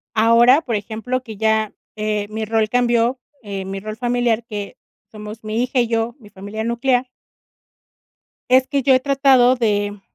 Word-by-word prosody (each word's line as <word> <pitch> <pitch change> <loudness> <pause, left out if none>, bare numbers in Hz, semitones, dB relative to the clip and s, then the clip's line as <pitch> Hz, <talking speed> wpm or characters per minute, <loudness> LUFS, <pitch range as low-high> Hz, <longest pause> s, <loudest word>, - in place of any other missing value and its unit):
Ahora, 235 +5 +5
por 240 -8 -3
ejemplo, 225 +5 -3
que 220 -5 -9
ya, 220 -1 +1 0.2
eh, 210 -1 -2
mi 220 +1 -4
rol 220 0 0
cambió, 240 +1 +1 0.2
eh, 195 -2 -5
mi 195 0 -5
rol 215 +2 -7
familiar, 240 -1 0
que 205 -3 -7 0.3
somos 215 +1 -9
mi 215 +2 -2
hija 255 +1 -1
y 240 - +2
yo, 230 +1 -1
mi 210 -4 -16
familia 205 +3 -7
nuclear. 245 +2 0 1.4
Es 260 0 +5
que 280 -1 0
yo 260 0 +4
he 255 - +3
tratado 270 -2 +4
de 205 -4 -1
225 Hz, 165 wpm, -20 LUFS, 215-245 Hz, 1.4 s, Ahora